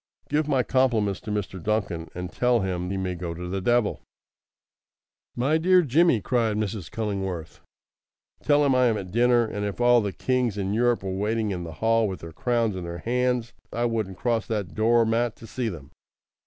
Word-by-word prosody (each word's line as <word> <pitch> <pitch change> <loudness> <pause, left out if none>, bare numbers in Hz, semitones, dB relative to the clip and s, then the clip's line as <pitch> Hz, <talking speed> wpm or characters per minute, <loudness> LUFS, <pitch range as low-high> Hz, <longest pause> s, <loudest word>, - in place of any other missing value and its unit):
"Give 150 +1 +1
my 135 -4 +2
compliments 115 -8 +1
to - - -9
Mr. 95 -3 -3
Duncan, 100 -5 -1
and 90 0 -5
tell 125 -2 +2
him 90 -1 -2
he 95 - -2
may 95 -1 -2
go 85 -1 -5
to 90 +1 -6
the 95 +2 -3
devil!" 120 +1 +1 1.3
"My 140 +6 +2
dear 180 +2 +5
Jimmy!" 155 -3 +3
cried 115 -3 0
Mrs. 105 -5 -3
Cullingworth. 95 -7 -4 0.8
"Tell 145 0 +3
him 135 - +3
I 125 -1 +4
am 110 -2 +1
at 95 -3 -6
dinner; 120 +2 +4
and 105 -2 -4
if 100 +1 -4
all 120 -1 +5
the 100 -2 -2
kings 125 +2 0
in 100 0 -1
Europe 120 -1 +2
were 95 - -3
waiting 105 +2 -1
in 90 -2 -4
the 80 - -7
hall 115 -1 +3
with 95 -3 -6
their 85 -1 -9
crowns 115 0 0
in 90 - -5
their 85 0 -5
hands 125 +3 -1 0.2
I 120 +1 -1
wouldn't 110 -5 -2
cross 115 -2 0
that 105 -5 -3
door 115 +1 +3
mat 115 +1 0
to - - -13
see 120 0 -3
them." 75 -7 -9
110 Hz, 195 wpm, -25 LUFS, 95-120 Hz, 1.3 s, dear